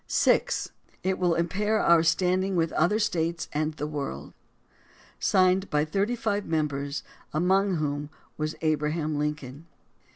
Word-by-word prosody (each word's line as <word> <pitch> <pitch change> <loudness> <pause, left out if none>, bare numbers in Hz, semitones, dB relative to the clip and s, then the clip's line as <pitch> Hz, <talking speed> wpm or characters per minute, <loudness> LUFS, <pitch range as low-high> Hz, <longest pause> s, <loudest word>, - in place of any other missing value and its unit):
(6) - - +2 0.3
It 190 0 0
will 175 -2 +2
impair 205 +6 0
our 170 -4 +5
standing 185 +3 +1
with 165 -2 +1
other 175 +7 +2
States 170 -6 -1
and 155 +1 -1
the 150 - -3
world.... 140 - -5 0.9
(Signed 185 +1 +3
by 150 0 +1
thirty 200 +9 0
five 205 -3 -1
members, 145 -3 -2 0.3
among 190 +4 +2
whom 145 -2 -2 0.3
was 155 0 -3
Abraham 155 -1 0
Lincoln.) 150 0 -4
165 Hz, 130 wpm, -27 LUFS, 150-185 Hz, 0.9 s, our